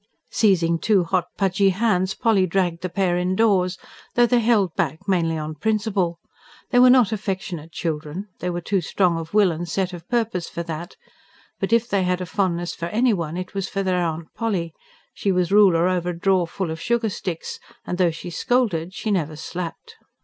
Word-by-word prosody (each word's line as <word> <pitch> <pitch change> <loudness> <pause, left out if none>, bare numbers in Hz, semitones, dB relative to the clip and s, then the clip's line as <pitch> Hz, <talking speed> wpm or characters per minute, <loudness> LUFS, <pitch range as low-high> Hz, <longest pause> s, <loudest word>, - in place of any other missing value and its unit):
Seizing 170 -6 +3
two 205 -3 +3
hot, 175 0 0
pudgy 195 0 +3
hands 190 -2 +1
Polly 200 -5 +2
dragged 175 -1 0
the 185 - -3
pair 175 -1 +1
indoors 185 0 +2 0.4
though 240 - +6
they 245 0 +3
held 215 -7 +2
back 160 +5 -2
mainly 165 -4 +1
on 155 0 -4
principle. 200 -2 0 0.5
They 245 - +5
were 250 0 +8
not 250 -4 +5
affectionate 190 -6 -4
children; 160 +4 -4
they 180 - -2
were 175 0 -3
too 195 +2 0
strong 175 0 +1
of 165 +4 -7
will 205 -4 +5
and 170 +1 -5
set 190 +1 -1
of 175 -1 -10
purpose 225 -7 -1
for 170 - -4
that; 165 +1 -6 0.6
but - - -2
if 230 0 +3
they 200 -4 +1
had 180 0 0
a 180 - -3
fondness 175 -2 -1
for 170 - -4
anyone 190 -7 0
it 185 +1 -6
was 195 -1 -3
for 195 -1 -2
their 185 -1 +1
Aunt 165 -1 -3
Polly: 190 -8 -2 0.4
she 200 - -1
was 180 -1 +1
ruler 185 -5 +5
over 180 -1 0
a 170 -1 -5
drawerful 185 -2 0
of 160 0 -6
sugar 235 +4 +1
sticks, 180 -4 -5 0.3
and 180 - -4
though 180 -2 +4
she 170 +2 -7
scolded 190 -6 0
she 215 - -2
never 160 -6 0
slapped. 180 - -7
185 Hz, 190 wpm, -23 LUFS, 170-205 Hz, 0.6 s, were